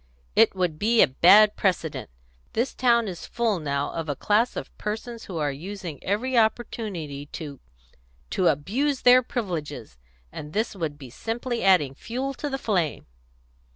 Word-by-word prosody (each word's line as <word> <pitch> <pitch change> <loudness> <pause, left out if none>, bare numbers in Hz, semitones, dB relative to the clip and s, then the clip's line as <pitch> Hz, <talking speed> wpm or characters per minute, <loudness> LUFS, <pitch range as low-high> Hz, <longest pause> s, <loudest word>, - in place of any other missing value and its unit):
"It - - +5
would 175 -5 -1
be 225 +2 +5
a - - +4
bad 200 +10 +6
precedent. 175 -5 -1 0.4
This 245 +4 0
town 235 -3 +3
is 180 -3 -7
full 230 -5 0
now 140 -2 -2
of 165 -2 -4
a 145 - -1
class 215 - +1
of - - -7
persons 225 +2 -5
who 180 - -6
are 150 -2 0
using 170 0 -7
every 240 +7 -1
opportunity 210 -10 -1
to 145 -3 -8 0.7
to 185 - +2
abuse 250 - 0
their 250 +1 +7
privileges. 150 - -5 0.3
And 150 +1 -8
this 220 0 -1
would 160 -6 -4
be 135 -5 -11
simply 235 - -3
adding 180 -9 +4
fuel 255 - -4
to 290 +2 -4
the 270 - -2
flame." 185 - -1
195 Hz, 155 wpm, -25 LUFS, 150-235 Hz, 0.7 s, their